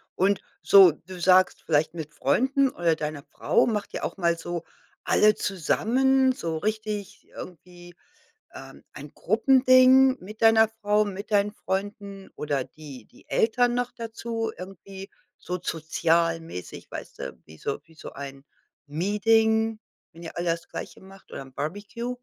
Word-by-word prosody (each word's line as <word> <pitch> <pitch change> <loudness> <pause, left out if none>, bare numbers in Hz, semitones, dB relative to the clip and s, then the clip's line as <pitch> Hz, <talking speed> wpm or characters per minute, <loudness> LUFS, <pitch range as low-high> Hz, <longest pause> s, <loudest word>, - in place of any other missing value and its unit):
Und 195 +2 +2 0.2
so 195 -4 +8
du 180 +4 -12
sagst 185 +1 +4
vielleicht 155 +1 +1
mit 155 -3 -7
Freunden 265 - +2
oder 170 -7 0
deiner 150 -2 -5
Frau - - +1
macht 210 -3 -3
ihr - - -5
auch - - -4
mal 170 -2 +1
so 170 0 -5 0.4
alle 215 0 +4
zusammen, 260 - +1
so 165 -8 -4
richtig 215 +1 -4
irgendwie, 175 -1 -12 0.6
ähm, - - -12
ein - - -10
Gruppending, 260 0 +5
mit 215 +3 -11
deiner 225 -1 +6
Frau, 210 -1 +1
mit 200 +2 -7
deinen 205 0 +2
Freunden 200 0 -5
oder 145 -3 -2
die 140 -7 -12
die - - -22
Eltern 240 +2 +2
noch 245 0 -1
dazu, 225 -1 -4
irgendwie 195 +1 -10 0.3
so 180 0 -5
sozialmäßig, 165 - -1
weißt - - -9
du, 70 - -6
wie 80 0 -15
so 140 - -4
wie 160 +1 -22
so - - -10
ein 135 0 -9 0.4
Meeting, 220 +6 +2 0.3
wenn 170 +1 -13
ihr 165 - -8
alle 170 -1 0
das 165 0 -5
Gleiche - - -8
macht 195 0 -16
oder - - -6
'n 135 -1 -13
Barbecue? 205 - -5
195 Hz, 150 wpm, -25 LUFS, 165-220 Hz, 0.6 s, so